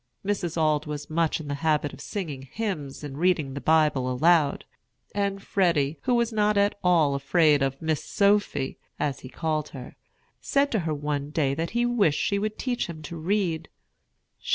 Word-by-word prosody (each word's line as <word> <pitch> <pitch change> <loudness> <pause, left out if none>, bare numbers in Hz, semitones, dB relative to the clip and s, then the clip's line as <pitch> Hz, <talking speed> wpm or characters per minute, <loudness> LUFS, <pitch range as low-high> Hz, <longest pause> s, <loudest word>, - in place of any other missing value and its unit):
Mrs. 180 -5 -1
Auld 155 -1 +1
was 150 0 -6
much 165 0 +1
in 155 - -8
the 145 - -2
habit 150 -3 +1
of - - -10
singing 160 -10 -5
hymns 155 -12 -4
and 145 -1 -6
reading 170 -6 +1
the 140 - -5
Bible 150 -5 +3
aloud; 155 +2 +3 0.5
and 200 -1 -1
Freddy, 165 -6 +1
who 250 -2 +1
was 235 -1 +1
not 210 -1 +2
at 200 +1 +3
all 165 -6 +4
afraid 150 +1 +3
of 135 0 -1
"Miss 160 -2 -1
Sophy," 200 -9 +1 0.2
as 140 -4 -1
he 130 - -10
called 155 0 -2
her, 125 -2 -10 0.4
said 280 0 +1
to 220 - +1
her - - +1
one 145 -1 -3
day 145 -3 +1
that 165 +4 -2
he 240 - +3
wished 210 -11 +2
she 200 - +1
would 215 +1 -3
teach 250 -2 -2
him 160 -2 -8
to 160 +3 -7
read. 165 -2 -1
160 Hz, 180 wpm, -26 LUFS, 145-200 Hz, 0.5 s, all